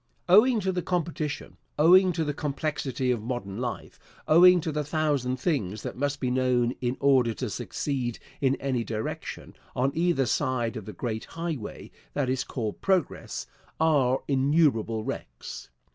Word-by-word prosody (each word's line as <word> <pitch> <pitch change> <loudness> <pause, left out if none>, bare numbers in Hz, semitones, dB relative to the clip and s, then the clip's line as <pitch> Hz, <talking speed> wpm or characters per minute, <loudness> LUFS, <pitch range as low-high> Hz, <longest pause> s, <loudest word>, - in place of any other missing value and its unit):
Owing 220 +6 +6
to 190 0 0
the 180 -1 -1
competition, 165 -4 -3 0.2
owing 180 +4 +6
to 165 -1 0
the 150 -1 -2
complexity 140 -3 -2
of 120 -3 -1
modern 110 -4 -4
life, 125 -1 -5 0.3
owing 180 +3 +7
to 160 - -2
the 150 0 -1
thousand 145 -4 0
things 110 - -1
that - - -5
must 145 +2 -1
be 125 -2 -1
known 125 -1 +2
in 125 0 -1
order 130 -5 +3
to - - -4
succeed 125 -5 -3 0.2
in 135 -1 +3
any 130 -4 -1
direction, 110 -1 -5 0.2
on 130 +2 +1
either 165 -5 +2
side 120 0 0
of 110 -4 -6
the 105 - -6
great 110 +2 -4
highway 165 -9 -6 0.2
that 140 -3 0
is 130 -1 0
called 110 -4 -4
Progress, 190 -2 -1 0.3
are 140 -5 +3
innumerable 135 -6 +2
wrecks. - - -7
135 Hz, 155 wpm, -27 LUFS, 120-155 Hz, 0.3 s, owing